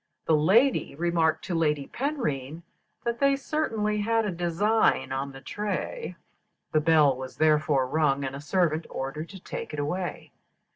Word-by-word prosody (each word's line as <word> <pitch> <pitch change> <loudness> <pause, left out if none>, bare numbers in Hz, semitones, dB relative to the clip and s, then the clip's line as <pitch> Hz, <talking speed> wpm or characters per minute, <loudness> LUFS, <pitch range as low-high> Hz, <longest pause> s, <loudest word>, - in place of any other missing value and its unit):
The 160 - +4
lady 210 - +3
remarked 165 0 +1
to 180 - -3
Lady 150 -4 +1
Penrhyn 170 - -3 0.4
that 235 0 -2
they 275 0 +4
certainly 225 -8 -1
had 225 +1 +1
a 205 - -1
design 175 0 +1
on 135 +1 -2
the 135 0 -11
tray. 210 - -4 0.6
The 155 - +3
bell 150 -4 +4
was 130 0 -8
therefore 150 -3 +3
rung, 140 -1 +1
and 135 0 -3
a 140 - -7
servant 165 -1 0
ordered 150 +5 -5
to 195 - -10
take 170 - -7
it - - -4
away. 175 +5 -3
165 Hz, 155 wpm, -27 LUFS, 145-210 Hz, 0.6 s, The